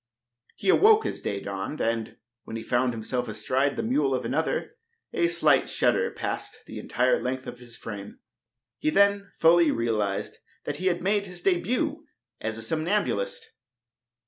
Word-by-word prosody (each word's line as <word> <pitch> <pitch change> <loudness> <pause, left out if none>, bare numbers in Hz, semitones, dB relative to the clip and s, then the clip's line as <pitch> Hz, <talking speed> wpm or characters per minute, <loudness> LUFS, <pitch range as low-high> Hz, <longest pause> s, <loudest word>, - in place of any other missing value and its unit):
He 195 - -2
awoke 430 - +6
as - - -3
day 100 - -2
dawned, 100 +10 -4
and, 115 -1 -1 0.3
when 110 - -7
he 115 - -4
found 125 +2 +1
himself 120 +2 -3
astride 130 +6 0
the - - -2
mule 255 +7 +2
of - - -3
another, 450 - -1 0.4
a 360 -7 +2
slight 350 0 +3
shudder 480 0 +2
passed - - -5
the - - -7
entire - - +1
length 130 0 -3
of 125 - -8
his 120 -2 -11
frame. 100 -2 -8 0.6
He - - +1
then 200 +2 +3
fully 165 0 +6
realized 110 -5 -1 0.2
that - - -4
he 185 - -1
had 175 -1 0
made 200 +1 +1
his 180 -1 -8
debut 250 - +1 0.4
as 110 0 -3
a 115 - -5
somnambulist. 155 - -1
155 Hz, 160 wpm, -27 LUFS, -, 0.6 s, awoke